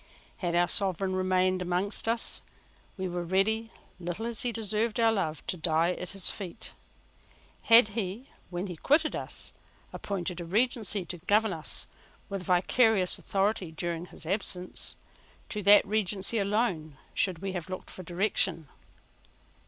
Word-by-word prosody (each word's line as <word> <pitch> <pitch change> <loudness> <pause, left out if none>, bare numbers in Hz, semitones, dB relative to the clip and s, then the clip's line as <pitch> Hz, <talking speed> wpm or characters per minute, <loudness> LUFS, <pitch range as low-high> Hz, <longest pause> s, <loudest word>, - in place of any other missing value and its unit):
Had 175 -2 -2
our 175 0 +4
Sovereign 190 0 0
remained 185 0 +2
among 180 +3 0 0.2
us, 230 0 +1 0.6
we 190 -1 -2
were 175 0 -3
ready, 220 +6 +1 0.3
little 175 +5 -4
as 235 -2 0
he 245 - +1
deserved 220 0 0
our 225 -1 +5
love, 160 -8 -2
to 185 - -2
die 165 +1 +2
at 180 0 -5
his 195 -2 +4
feet. 190 -5 -4 0.9
Had 230 -2 +7
he, 215 +3 -4 0.2
when 175 +1 -3
he 180 -4 -6
quitted 310 - +2
us, - - -6 0.4
appointed 180 -3 -4
a - - -4
regency 210 +1 +1
to 175 0 -5
govern 210 +3 +2
us 160 -2 -3 0.4
with 195 -1 -3
vicarious 185 +2 +3
authority 195 -3 0
during 170 +1 -4
his 160 - -11
absence, 185 0 -3 0.5
to 210 - -3
that 205 +1 +7
regency 210 +1 0
alone 195 - 0 0.2
should 185 -4 +1
we 195 +3 -4
have 180 -1 -5
looked 185 - -6
for - - -8
direction. 180 -3 0
190 Hz, 145 wpm, -29 LUFS, 175-215 Hz, 0.9 s, Had